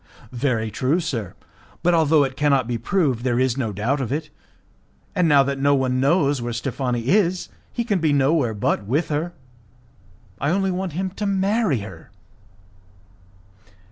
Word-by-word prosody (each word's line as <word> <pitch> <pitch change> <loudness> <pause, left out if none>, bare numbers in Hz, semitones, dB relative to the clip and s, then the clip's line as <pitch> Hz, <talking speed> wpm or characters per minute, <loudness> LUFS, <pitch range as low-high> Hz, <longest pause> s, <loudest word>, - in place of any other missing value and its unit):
"Very 120 -4 -1
true, 135 - +1
sir, 125 - -4 0.5
but 175 0 +3
although 160 -2 +4
it 130 -1 -3
cannot 140 -3 +2
be 120 -1 -2
proved, 135 - 0
there 125 -1 +1
is 130 -2 +2
no 120 -5 -2
doubt 115 +8 -1
of 125 - -3
it, 150 +1 -3 0.8
and 180 -4 +2
now 140 -2 +6
that 135 0 -2
no 140 +1 +3
one 130 -1 0
knows 140 -1 +2
where 120 0 -3
Steffani 120 0 -2
is, 185 -2 +2 0.2
he 235 - -2
can 205 -5 0
be 160 -2 +2
nowhere 140 -4 +2
but 105 +1 0
with 145 +8 0
her. 155 +3 -1 1.1
I 145 - 0
only 190 +2 +1
want 185 -2 -3
him 185 +3 -2
to 205 +2 -4
marry 195 - +1
her." 90 -6 -10
140 Hz, 165 wpm, -22 LUFS, 125-175 Hz, 1.1 s, now